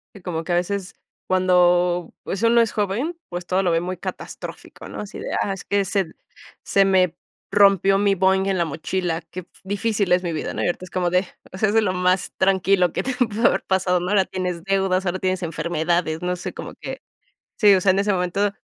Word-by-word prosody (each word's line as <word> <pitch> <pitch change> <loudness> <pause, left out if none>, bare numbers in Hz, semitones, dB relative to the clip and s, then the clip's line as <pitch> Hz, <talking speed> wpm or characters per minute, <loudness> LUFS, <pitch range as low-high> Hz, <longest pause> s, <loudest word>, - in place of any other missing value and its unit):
Que 200 - -12
como 165 -3 -4
que, 175 - -1
a - - +3
veces 190 +2 -2 0.3
cuando 180 -1 +3
pues 195 - -4
uno 235 +1 +5
es 230 - +1
joven, 220 - -2
pues 175 0 -6
todo 185 +2 +1
lo 180 - +2
ve 165 0 +2
muy 185 +1 -4
catastrófico - - -8
¿no? - - -7
Así 210 - -8
de, - - -6 0.2
ah, 200 - -1
es 195 - -9
que 200 0 +1
se 190 -3 -1 0.5
se 195 0 +3
me 185 -3 +3 0.4
rompió 195 -1 +5
mi 200 0 +2
Boing 190 +1 +2
en 195 -1 +1
la 170 - +2
mochila, 165 +2 -2
qué 185 - -5
f 180 - -22 0.2
difícil 205 -1 -1
es 180 +1 +2
mi 175 - -2
vida, 155 - -3
¿no? - - -3
Y - - +1
ahorita 175 +1 -3
es - - -14
como 180 -1 0
de, 180 +1 +1 0.2
o - - -8
sea, 215 - +2
es 210 - -1
de 225 - +5
lo 200 - +1
más 180 0 +1
tranquilo 190 -2 +2
que - - -1
te 265 - -2
pudo 230 -2 +2
haber - - +1
pasado, 185 -1 +1
¿no? 175 - -4
Ahora 200 -1 +4
tienes 180 -2 -4
deudas, 195 -1 +1
ahora 185 +1 -1
tienes 185 0 -1
enfermedades, 165 0 -1
no 180 0 -1
sé 180 - -6
como - - -8
que - - -7 0.6
sí, 210 -3 +7
o 185 - +3
sea, 195 - +2
en 190 - +1
ese 200 +1 +1
momento 190 +3 0
185 Hz, 230 wpm, -22 LUFS, 180-195 Hz, 0.6 s, sí